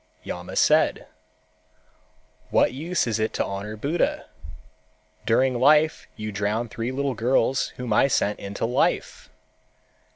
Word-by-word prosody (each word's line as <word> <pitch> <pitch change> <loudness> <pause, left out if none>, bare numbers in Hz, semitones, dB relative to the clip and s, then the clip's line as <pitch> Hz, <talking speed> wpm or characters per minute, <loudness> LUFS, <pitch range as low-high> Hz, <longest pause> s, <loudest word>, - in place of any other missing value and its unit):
Yama 90 0 -7
said, - - +3 1.4
"What - - +3
use 165 +7 -1
is 115 -2 -1
it 110 0 -1
to - - -1
honor 100 +2 -5
Buddha? 150 +10 -1 1.0
During 125 +2 +2
life 150 +4 +3
you 110 -1 -5
drowned 105 +3 -2
three 115 +1 -3 0.2
girls 125 +2 +1
whom 125 -3 -2
I 120 - +4
sent 105 -5 0
into 100 +2 -4
life. 120 +2 -1
115 Hz, 120 wpm, -24 LUFS, 105-130 Hz, 1.4 s, I